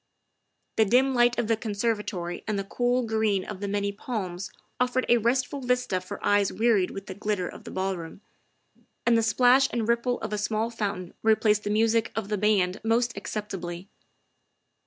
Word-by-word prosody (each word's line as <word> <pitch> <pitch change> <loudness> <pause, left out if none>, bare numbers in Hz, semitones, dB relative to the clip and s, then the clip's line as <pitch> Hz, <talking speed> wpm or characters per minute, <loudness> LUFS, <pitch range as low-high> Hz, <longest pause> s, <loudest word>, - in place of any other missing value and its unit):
The 220 - +5
dim 260 +6 +3
light 240 -1 +3
of 240 - +1
the 225 - +3
conservatory 210 -5 -2
and 215 -1 -1
the 195 - -1
cool 245 +5 0
green 220 -4 +1
of 205 -2 -7
many 200 0 -1
palms 200 -4 -5 0.3
offered 250 +1 +1
a 240 - +6
restful 255 +4 0
vista 250 -7 0
for 185 - -7
eyes 205 -1 +3
wearied 220 -5 +2
with 195 0 -7
the 190 - -6
glitter 200 -2 -2
of - - -10
the - - -7
ballroom, 190 -1 -4 0.8
and 235 - +4
the 230 - +4
splash 250 +4 +4
and 230 -2 -1
ripple 235 +1 +1
of 215 -1 -4
a 210 - -1
small 220 +2 -1
fountain 195 -5 -4
replaced 215 -1 +3
the - - -1
music 225 +1 +2
of 220 -3 -3
the 210 - 0
band 200 -2 +2
most 235 +2 +1
acceptably. 190 -3 -5
215 Hz, 175 wpm, -27 LUFS, 195-235 Hz, 0.8 s, a